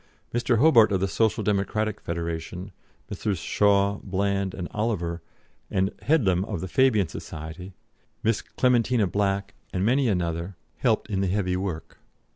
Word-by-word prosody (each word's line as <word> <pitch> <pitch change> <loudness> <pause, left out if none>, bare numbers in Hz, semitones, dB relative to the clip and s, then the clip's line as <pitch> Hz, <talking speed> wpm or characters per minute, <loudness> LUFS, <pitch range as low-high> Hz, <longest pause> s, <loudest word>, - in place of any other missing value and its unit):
Mr. 120 0 +2
Hobart 120 -5 +6
of 95 - +2
the 95 - +1
Social 110 +3 +1
Democratic 105 +1 0
Federation, 85 +3 -4 0.4
Messrs. 105 -4 -2
Shaw, 100 +3 +2
Bland, 100 0 -1
and 90 -2 -4
Oliver, 90 -6 -2 0.5
and 95 +1 +1
Headlam 105 - +2
of 105 -5 -4
the 95 - -4
Fabian 110 -3 +3
Society, 80 +5 -8 0.5
Miss 115 -1 +1
Clementina 125 -3 +2
Black, 100 +1 -1 0.2
and 95 +1 -1
many 130 +3 +3
another 85 -2 -1 0.2
helped - - +1
in 95 -1 0
the 95 - +1
heavy 90 -1 0
work. 90 -4 -5
100 Hz, 140 wpm, -26 LUFS, 90-110 Hz, 0.5 s, Hobart